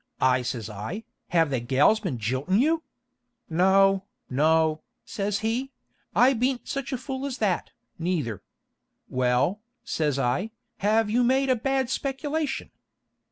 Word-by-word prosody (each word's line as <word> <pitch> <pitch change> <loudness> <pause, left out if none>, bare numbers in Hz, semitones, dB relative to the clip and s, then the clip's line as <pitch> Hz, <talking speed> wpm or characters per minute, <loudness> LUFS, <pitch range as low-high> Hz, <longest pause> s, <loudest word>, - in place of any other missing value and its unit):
I 130 -1 +3
says 120 -3 -4
I, 110 - -6 0.2
'have 165 -4 +2
the 130 - +1
gals 135 - +3
been 180 - -3
jiltin' 130 - 0
you?' 320 +5 +3 0.7
'No, 190 +3 +4 0.3
no,' 155 +3 +3 0.2
says 200 +1 -2
he; 240 +5 -1 0.4
'I 255 +3 +6
beant 250 +1 -1
such 275 0 -3
a 260 - -1
fool 265 +1 -5
as 265 -2 -4
that, 195 -6 0 0.3
neither.' 160 - -1 0.7
'Well,' 130 - +1 0.2
says 150 -4 -1
I, 135 - 0 0.3
'have 210 +1 +2
you 245 +2 +3
made 265 +2 +2
a - - +4
bad 265 +1 0
speculation?' 290 +2 -2
195 Hz, 135 wpm, -26 LUFS, -, 0.7 s, I